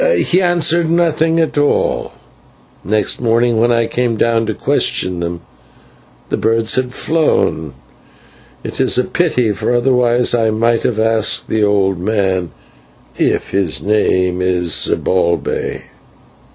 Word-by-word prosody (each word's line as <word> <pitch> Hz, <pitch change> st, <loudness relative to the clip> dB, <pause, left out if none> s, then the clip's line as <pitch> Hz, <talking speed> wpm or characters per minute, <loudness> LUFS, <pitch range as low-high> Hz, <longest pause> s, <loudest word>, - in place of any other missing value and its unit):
"He 180 Hz, +2 st, +1 dB
answered 170 Hz, -2 st, +1 dB
nothing 165 Hz, -1 st, +1 dB
at 160 Hz, -2 st, 0 dB
all. 145 Hz, -, 0 dB, 0.7 s
Next 105 Hz, +4 st, -1 dB
morning, 115 Hz, 0 st, +1 dB
when 120 Hz, +1 st, +3 dB
I 115 Hz, -1 st, +2 dB
came 120 Hz, -1 st, -1 dB
to 115 Hz, -1 st, 0 dB
question 90 Hz, -1 st, -1 dB
them, 85 Hz, 0 st, -4 dB, 0.9 s
the -, -, -1 dB
birds 115 Hz, 0 st, +1 dB
had 130 Hz, -1 st, -1 dB
flown. 125 Hz, -, -1 dB, 0.9 s
It -, -, -4 dB
is -, -, +2 dB
a 125 Hz, -, +3 dB
pity, 125 Hz, -9 st, 0 dB
for 105 Hz, -, -2 dB
otherwise 125 Hz, -1 st, +2 dB
I 115 Hz, -2 st, +2 dB
might 115 Hz, +1 st, +1 dB
have 120 Hz, -, -1 dB
asked 110 Hz, -1 st, 0 dB
the 110 Hz, -1 st, 0 dB
old 100 Hz, -3 st, +1 dB
man 95 Hz, -3 st, -1 dB, 0.7 s
if -, -, 0 dB
his 95 Hz, -5 st, -1 dB
name 95 Hz, -3 st, +1 dB
is 90 Hz, -2 st, 0 dB
Zibalbay. 85 Hz, -2 st, 0 dB
115 Hz, 125 wpm, -15 LUFS, 95-125 Hz, 0.9 s, when